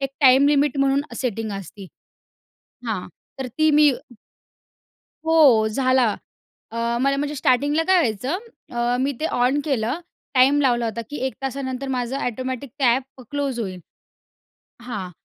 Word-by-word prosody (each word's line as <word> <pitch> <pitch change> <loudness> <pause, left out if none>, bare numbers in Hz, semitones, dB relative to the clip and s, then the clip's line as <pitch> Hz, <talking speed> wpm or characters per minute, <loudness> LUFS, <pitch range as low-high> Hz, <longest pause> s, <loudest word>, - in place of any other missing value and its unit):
एक 275 -1 -2
time 265 0 +6
limit 290 -1 +2
म्हणून 275 0 +3 0.2
setting 225 -3 -2
असती. 195 +1 -10 1.0
हां, 210 -5 -3 0.3
तर 265 - -3
ती 310 0 +4
मी 300 0 +6 1.4
हो 285 -9 +5
झाला. 255 0 +2 0.6
अ, 230 - -8 0.2
मला 275 +1 +2
म्हणजे 290 +1 -2
स्टार्टिंगला 285 +3 +2
काय 375 - +5
व्हायचं 255 - 0 0.4
अ, 240 +1 +1
मी 275 +2 +1
ते 315 - +1
ऑन 260 +4 +3
केलं 260 +1 -1 0.3
टाईम 270 +3 +5
लावला 240 -4 +2
होता, 225 +1 -3
की 295 - -5
1 265 - -4
तासानंतर 270 0 -4
माझं 250 0 -2
ऑटोमॅटिक 255 +2 -4
ते - - +2
ॲप 260 +2 +1
क्लोज 280 -3 -2
होईल. 185 -4 -5 1.0
हां, 210 -7 -5
260 Hz, 140 wpm, -22 LUFS, 240-280 Hz, 1.4 s, टाईम